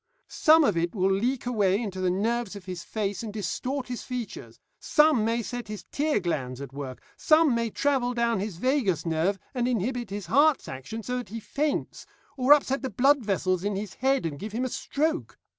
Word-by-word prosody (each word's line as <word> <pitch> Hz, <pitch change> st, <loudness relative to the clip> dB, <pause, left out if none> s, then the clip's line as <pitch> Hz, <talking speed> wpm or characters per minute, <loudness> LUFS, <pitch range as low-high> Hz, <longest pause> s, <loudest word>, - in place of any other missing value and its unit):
Some 315 Hz, +1 st, +5 dB
of 210 Hz, -10 st, +2 dB
it 170 Hz, +3 st, -1 dB
will 190 Hz, 0 st, +2 dB
leak 240 Hz, +7 st, 0 dB
away 205 Hz, -5 st, +2 dB
into 195 Hz, -5 st, -4 dB
the 185 Hz, -, +2 dB
nerves 220 Hz, +3 st, -1 dB
of 200 Hz, -2 st, -10 dB
his 180 Hz, -2 st, -6 dB
face 205 Hz, -4 st, -3 dB
and 225 Hz, -2 st, -5 dB
distort 250 Hz, +7 st, -3 dB
his 245 Hz, -2 st, -5 dB
features, 250 Hz, -3 st, -6 dB, 0.2 s
some 300 Hz, -7 st, +4 dB
may 230 Hz, +1 st, 0 dB
set 245 Hz, 0 st, -5 dB
his 210 Hz, -1 st, -7 dB
tear 295 Hz, -3 st, +1 dB
glands 135 Hz, -8 st, -3 dB
at 140 Hz, -2 st, -8 dB
work, 135 Hz, -2 st, -7 dB
some 310 Hz, -3 st, +4 dB
may 230 Hz, -1 st, 0 dB
travel 250 Hz, 0 st, 0 dB
down 235 Hz, -3 st, +1 dB
his 195 Hz, -3 st, -4 dB
vagus 220 Hz, -, +1 dB
nerve 165 Hz, +4 st, +1 dB, 0.2 s
and 245 Hz, -2 st, 0 dB
inhibit 245 Hz, 0 st, -1 dB
his 200 Hz, -1 st, -5 dB
heart's 285 Hz, -, +3 dB
action 135 Hz, -, -6 dB
so 250 Hz, +2 st, -2 dB
that 245 Hz, -, -8 dB
he 230 Hz, -, -5 dB
faints, 290 Hz, +6 st, -2 dB, 0.3 s
or 260 Hz, 0 st, +2 dB
upset 280 Hz, -2 st, +5 dB
the 265 Hz, -, -3 dB
blood 270 Hz, +2 st, +3 dB
vessels 185 Hz, -3 st, 0 dB
in 205 Hz, 0 st, -1 dB
his 200 Hz, -1 st, -4 dB
head 265 Hz, -2 st, +1 dB
and 145 Hz, -3 st, -4 dB
give 210 Hz, +4 st, -6 dB
him 245 Hz, +3 st, -1 dB
a -, -, -2 dB
stroke. 315 Hz, +6 st, -2 dB
225 Hz, 205 wpm, -27 LUFS, 190-260 Hz, 0.3 s, Some